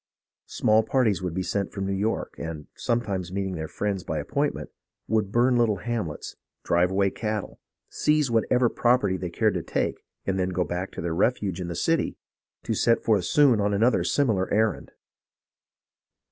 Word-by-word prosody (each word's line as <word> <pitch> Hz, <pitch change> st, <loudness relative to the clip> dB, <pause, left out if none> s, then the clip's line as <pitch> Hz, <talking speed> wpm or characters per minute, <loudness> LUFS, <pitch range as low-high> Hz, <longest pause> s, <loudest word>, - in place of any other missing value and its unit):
Small 110 Hz, +1 st, +3 dB
parties 110 Hz, -7 st, +1 dB
would 90 Hz, -2 st, -3 dB
be 95 Hz, -, -1 dB
sent 95 Hz, +1 st, -2 dB
from 95 Hz, -1 st, -4 dB
New 100 Hz, -, -1 dB
York, 105 Hz, +4 st, -1 dB
and, 80 Hz, -2 st, -5 dB
sometimes 100 Hz, -7 st, -2 dB
meeting 95 Hz, 0 st, -2 dB
their 80 Hz, -2 st, -4 dB
friends 100 Hz, +1 st, -2 dB
by 80 Hz, -, -3 dB
appointment, 75 Hz, -1 st, -2 dB, 0.4 s
would 110 Hz, -2 st, 0 dB
burn 120 Hz, +2 st, +3 dB
little 115 Hz, -3 st, +3 dB
hamlets, 100 Hz, -6 st, -4 dB, 0.3 s
drive 85 Hz, +1 st, +2 dB
away 100 Hz, 0 st, +1 dB
cattle, 105 Hz, -1 st, -4 dB, 0.3 s
seize 150 Hz, -4 st, +1 dB
whatever 120 Hz, +2 st, +3 dB
property 120 Hz, -5 st, +2 dB
they 90 Hz, -1 st, -4 dB
cared 85 Hz, -, +1 dB
to -, -, -2 dB
take, -, -, -2 dB, 0.2 s
and 95 Hz, 0 st, -1 dB
then 90 Hz, 0 st, +1 dB
go 90 Hz, 0 st, 0 dB
back 90 Hz, +2 st, -3 dB
to -, -, -5 dB
their 85 Hz, 0 st, -2 dB
refuge 95 Hz, -1 st, 0 dB
in 90 Hz, -, -4 dB
the 85 Hz, -, -4 dB
city -, -, 0 dB, 0.5 s
to -, -, -1 dB
set 115 Hz, -, +2 dB
forth 105 Hz, -5 st, +2 dB
soon 135 Hz, -5 st, +4 dB
on 100 Hz, 0 st, +1 dB
another 115 Hz, +5 st, +3 dB
similar 110 Hz, -10 st, +1 dB
errand. 110 Hz, +1 st, +1 dB
100 Hz, 175 wpm, -26 LUFS, 90-115 Hz, 0.5 s, soon